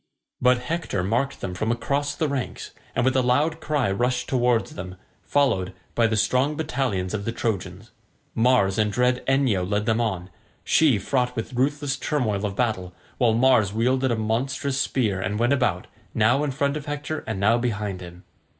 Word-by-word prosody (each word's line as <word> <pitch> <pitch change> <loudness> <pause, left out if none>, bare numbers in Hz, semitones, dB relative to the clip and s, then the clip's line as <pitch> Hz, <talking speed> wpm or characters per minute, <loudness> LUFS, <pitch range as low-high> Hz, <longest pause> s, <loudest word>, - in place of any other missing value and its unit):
But 125 0 +5
Hector 160 - -2
marked 120 +8 -1
them 90 - -4
from 110 +5 -1
across 140 +5 -1
the 155 +1 0
ranks, 140 -3 -4 0.2
and - - +1
with 130 0 +2
a 130 - +4
loud 145 +6 +1
cry 145 -9 0
rushed 120 +4 0
towards 120 -3 +1
them, 90 0 -7 0.3
followed 95 -10 +1 0.2
by 115 -1 +3
the 110 -1 0
strong 130 +7 +2
battalions 125 - -2
of 105 -2 -2
the 115 - -2
Trojans. 105 -2 -4 0.4
Mars 115 -5 +3
and 105 -1 +2
dread 125 +2 +1
Enyo 135 -8 +2
led 105 +3 -1
them 110 +1 +1
on, 95 -5 -2 0.3
she 150 -8 +4
fraught 125 +4 -1
with 115 +1 -4
ruthless 140 +2 0
turmoil 110 -10 -1
of 100 - -6
battle, 95 -7 -1 0.2
while 120 -4 +4
Mars 115 -4 +3
wielded 130 +4 +1
a 120 - +1
monstrous 130 +5 -1
spear, 105 -9 0
and 100 +3 -2
went 120 +4 +2
about, 120 -10 0 0.3
now 115 +6 +3
in 150 - 0
front 140 +1 0
of 150 -1 -6
Hector 145 +1 -3
and 110 -4 -3
now 110 +4 +3
behind 105 -5 -2
him. 90 0 -11
120 Hz, 180 wpm, -24 LUFS, 105-135 Hz, 0.4 s, But